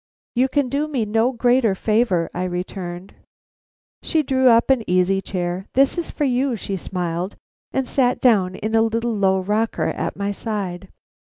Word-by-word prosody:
"You 255 +2 +3
can 285 0 +1
do 285 +4 -1
me 265 -7 -1
no 225 +4 +2
greater 245 -3 +2
favor," 210 -5 +1
I 180 +1 -2
returned. 180 0 -5 0.9
She 315 -1 +1
drew 260 -2 +3
up 235 +3 +4
an 255 -4 +2
easy 185 +2 +2
chair. 180 0 -3
"That 270 +1 +4
is 345 - -3
for 300 - -3
you," 260 -1 +1
she 200 -2 -4
smiled, 180 0 -3 0.4
and 265 -1 -1
sat 250 -2 +1
down 195 -7 +3
in 215 +3 -4
a 225 - +4
little 230 +1 0
low 190 -2 +2
rocker 210 +4 0
at - - -3
my 200 0 -1
side. 195 -4 -4
220 Hz, 170 wpm, -21 LUFS, 185-250 Hz, 0.9 s, up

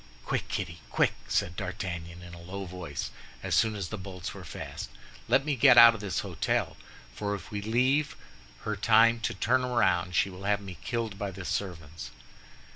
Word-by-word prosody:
"Quick, - - -1
Kitty, 85 -1 -4
quick!" - - +2
said 90 - 0
D'Artagnan, 90 -2 -5
in 85 0 -10
a 85 - -10
low 95 +3 -6
voice, 90 -5 -5 0.3
as - - -2
soon 110 -1 +3
as 95 -4 -4
the 110 - -5
bolts 90 -1 -6
were - - -9
fast, - - -7 0.4
"let 135 - +3
me 150 -2 0
get 130 0 +6
out 115 0 +11
of 115 - -7
the 105 - -5
hôtel; 95 - -1 0.4
for 100 +10 -2
if 100 - -10
we 105 -1 -3
leave 130 +7 +2 0.5
her 105 - -2
time 115 +3 +5
to 110 - -2
turn 125 +6 +2
round, 90 -8 +1
she 95 - +2
will 95 +2 -9
have 100 0 +2
me 95 -5 -9
killed 115 -2 -3
by 100 - -2
the 95 -1 -8
servants." 85 -9 -4
100 Hz, 190 wpm, -29 LUFS, 90-115 Hz, 0.5 s, out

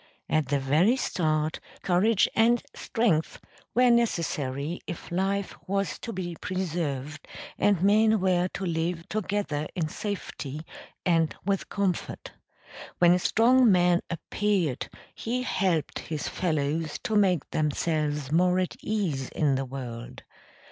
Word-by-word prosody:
At 155 -3 +1
the 140 +2 +1
very 155 - +3
start 155 -8 0 0.2
courage 195 +4 +3
and 235 +1 +4
strength 195 -9 0 0.4
were 250 0 +5
necessary 160 - 0
if 175 0 -7
life 195 +2 0
was 195 0 -1
to 235 - -5
be 180 -4 -4
preserved 155 -6 -3 0.3
and 200 -4 +3
men 215 +2 +4
were 180 -1 +2
to 195 - -3
live 165 0 -2
together 195 -6 -2
in 165 -3 0
safety 155 -8 -5 0.4
and 165 -3 +2
with 195 -1 -1
comfort. 195 -4 -2 0.7
When 175 0 +6
a 180 - +2
strong 240 +4 +4
man 180 -1 +4
appeared 180 -4 -1 0.2
he 250 +2 -2
helped 180 - 0
his 155 -2 -4
fellows 155 -2 -1
to 220 - -1
make 185 -7 +3
themselves 150 -2 -1
more 180 +3 +3
at 185 -1 -1
ease 170 -12 -1
in 150 -3 +1
the 135 0 -1
world. 125 -3 -7
175 Hz, 125 wpm, -27 LUFS, 155-200 Hz, 0.7 s, When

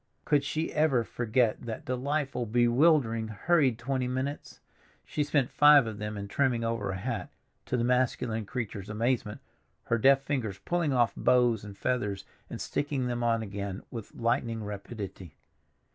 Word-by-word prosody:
Could 145 -2 +3
she 155 +3 -2
ever 150 -6 +3
forget 115 0 0
that 115 -2 -6
delightful, 130 -1 -2
bewildering, 120 0 +3
hurried 130 +3 +2
twenty 130 +1 -2
minutes? 130 +3 -4 0.5
She 150 - -1
spent 145 -3 +1
five 145 -3 +7
of 110 -1 -6
them 105 0 -4
in 100 0 -5
trimming 120 +1 +1
over 115 -3 -1
a 95 - -2
hat, 115 +4 -4 0.4
to 125 - 0
the 115 - 0
masculine 120 -3 0
creature's 105 -6 -5
amazement, 110 0 -1 0.4
her 115 - 0
deft 135 +3 +5
fingers 120 -9 -2
pulling 170 - -1
off 120 -3 +2
bows 120 -4 +3
and 100 -1 -10
feathers 105 -6 -1 0.2
and - - -6
sticking 145 -3 -2
them 120 -1 -2
on 115 -1 +1
again 100 -1 -5
with 115 -4 -8
lightning 115 -1 -1
rapidity. 100 - -7
120 Hz, 155 wpm, -29 LUFS, 110-135 Hz, 0.5 s, five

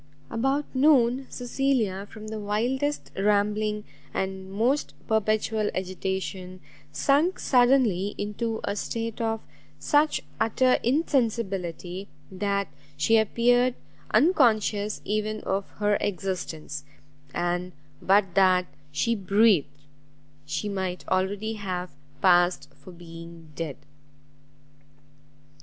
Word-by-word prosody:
About 270 +5 0
noon, 260 -2 +4
Cecilia, 245 -6 -1
from 215 -1 -9
the 220 0 -4
wildest 245 +8 -1
rambling 210 +1 +1 0.3
and 190 0 -3
most 240 +8 0
perpetual 215 0 +1
agitation, 185 0 -4 0.3
sunk 300 +7 +2
suddenly 245 -7 +3
into 220 +2 -3
a 200 - -1
state 230 +2 -3
of 225 -1 -1 0.4
such 300 +1 +2 0.2
utter 255 +3 +3
insensibility, 200 - -1 0.2
that 200 +1 -1 0.3
she 185 +10 +3
appeared 245 +3 +3 0.3
unconscious 215 - +3
even 215 +1 -1
of 195 +1 -2
her 205 0 +2
existence; 170 -6 -3 0.5
and 175 +1 -1 0.3
but 195 -1 +3
that 185 -1 +4 0.3
she 230 +11 +1
breathed, 195 -8 +2 0.6
she 145 +8 -2
might 190 -3 -3
already 200 +4 0
have 185 -4 -4 0.3
passed 175 -1 +3
for 185 - -14
being 165 -1 -12
dead. 155 -3 -4
205 Hz, 95 wpm, -26 LUFS, 185-230 Hz, 0.6 s, noon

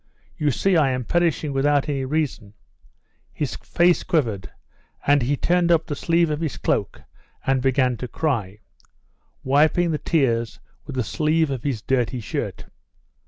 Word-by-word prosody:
"You 150 -4 0
see 190 +7 +1
I 145 -4 +3
am 125 -2 -2
perishing 165 -3 0
without 140 +1 +2
any 135 -3 -2
reason." 130 -8 -2 0.8
His 145 -4 -3
face 175 0 +2
quivered 120 - -1 0.6
and 145 0 +4
he 135 +4 0
turned 175 +2 +2
up 165 -1 +3
the 145 - -4
sleeve 165 +1 +1
of 150 +1 -2
his 160 -4 -3
cloak - - -1 0.4
and 135 -1 +2
began 130 -2 +2
to 125 - -5
cry, 110 -9 -2 0.8
wiping 155 +5 +3
the 155 - -1
tears 120 -8 0 0.3
with 140 - -6
the 125 - 0
sleeve 155 +4 +1
of 130 -3 -3
his 125 -5 -3
dirty 125 -1 0
shirt. 110 - -4
145 Hz, 155 wpm, -23 LUFS, 125-160 Hz, 0.8 s, and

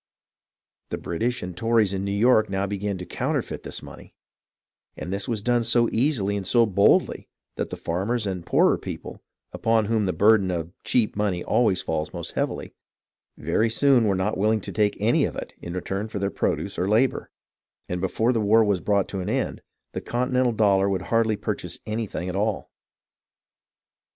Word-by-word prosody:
The - - -3
British 120 +9 -2
and 90 -1 -6
Tories 110 0 +2
in 95 0 -2
New 100 - -2
York 110 +1 +3
now 95 0 -1
began 100 0 -3
to 90 - -7
counterfeit - - -3
this - - -7
money, - - -13 0.8
and 90 - -5
this 100 0 -2
was 110 -4 -2
done 120 0 +2
so 120 +1 +3
easily 115 -6 +1
and 100 -2 -4
so 120 -1 +4
boldly 100 -1 +2 0.3
that - - -3
the - - -6
farmers 105 +7 -2
and 95 -3 -3
the - - -18
poorer - - +3
people, - - -8 0.3
upon 115 -1 +2
whom 110 -2 +1
the - - +1
burden 105 -1 +4
of 85 -1 -3
"cheap 115 -4 +1
money" 100 -4 -1
always 105 -6 +2
falls 80 -1 -3
most - - -4
heavily, - - -3 0.6
very 115 +1 +1
soon 130 0 +3
were 100 -2 +2
not 95 +2 -1
willing 110 +1 +2
to - - -6
take 105 -1 +1
any - - +3
of - - -2
it - - -7
in 85 - -7
return 95 +3 -3
for 110 - -6
their 100 0 -1
produce - - -2
or 95 - 0
labour; 115 +5 +1 0.6
and 90 0 -3
before 110 +6 +1
the 115 - 0
war 110 +2 +5
was 100 -4 +1
brought 100 +1 +1
to 95 - -4
an 95 +2 -3
end, 130 +3 -2 0.3
the - - -5
con 125 +2 -2
tinental 125 -3 +1
dollars 100 -2 +3
would 95 -2 -1
hardly 115 -1 +3
purchase - - -4
anything 110 -4 -3
at 90 - -4
all. 105 +1 -1
105 Hz, 190 wpm, -24 LUFS, 95-115 Hz, 0.8 s, war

